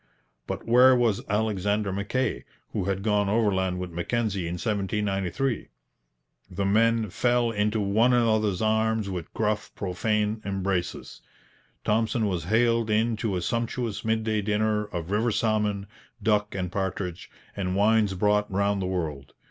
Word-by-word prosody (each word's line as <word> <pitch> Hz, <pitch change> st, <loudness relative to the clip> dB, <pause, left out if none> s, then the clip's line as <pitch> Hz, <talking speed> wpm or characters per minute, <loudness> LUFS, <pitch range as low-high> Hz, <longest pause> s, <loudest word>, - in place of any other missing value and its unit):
But -, -, -5 dB
where 125 Hz, +2 st, +6 dB
was 120 Hz, -5 st, +2 dB
Alexander 105 Hz, -1 st, 0 dB
Mackay, 105 Hz, +7 st, -1 dB, 0.3 s
who -, -, -1 dB
had 100 Hz, 0 st, -2 dB
gone 105 Hz, -2 st, +2 dB
overland 95 Hz, -4 st, +1 dB
with 90 Hz, -1 st, -5 dB
Mackenzie 95 Hz, +1 st, -1 dB
in 85 Hz, -, -3 dB
1793? 105 Hz, +3 st, -1 dB, 0.8 s
The 95 Hz, +2 st, -2 dB
men 110 Hz, +1 st, +2 dB
fell 120 Hz, +1 st, +2 dB
into 105 Hz, 0 st, 0 dB
one 105 Hz, +5 st, +3 dB
another's 110 Hz, -5 st, +2 dB
arms 110 Hz, -1 st, +1 dB
with 90 Hz, -3 st, -5 dB
gruff, 105 Hz, -1 st, -1 dB
profane 105 Hz, +3 st, -1 dB
embraces. 95 Hz, -2 st, -3 dB, 0.6 s
Thompson 110 Hz, +1 st, +1 dB
was 90 Hz, -6 st, -2 dB
haled 115 Hz, +2 st, +2 dB
in 110 Hz, +2 st, +2 dB
to 105 Hz, -3 st, -1 dB
a 90 Hz, -, -2 dB
sumptuous 115 Hz, +1 st, -2 dB
midday 110 Hz, -1 st, 0 dB
dinner 105 Hz, +1 st, 0 dB
of 85 Hz, -3 st, -6 dB
river 110 Hz, +4 st, +2 dB
salmon, 105 Hz, -2 st, 0 dB, 0.4 s
duck 105 Hz, -2 st, +1 dB
and 90 Hz, -2 st, -3 dB
partridge, 95 Hz, -2 st, -3 dB, 0.3 s
and 95 Hz, -2 st, -2 dB
wines 105 Hz, -1 st, +3 dB
brought 105 Hz, +2 st, +1 dB
round 100 Hz, +1 st, +1 dB
the 90 Hz, -, -1 dB
world. 80 Hz, -7 st, -4 dB
105 Hz, 140 wpm, -26 LUFS, 95-110 Hz, 0.8 s, where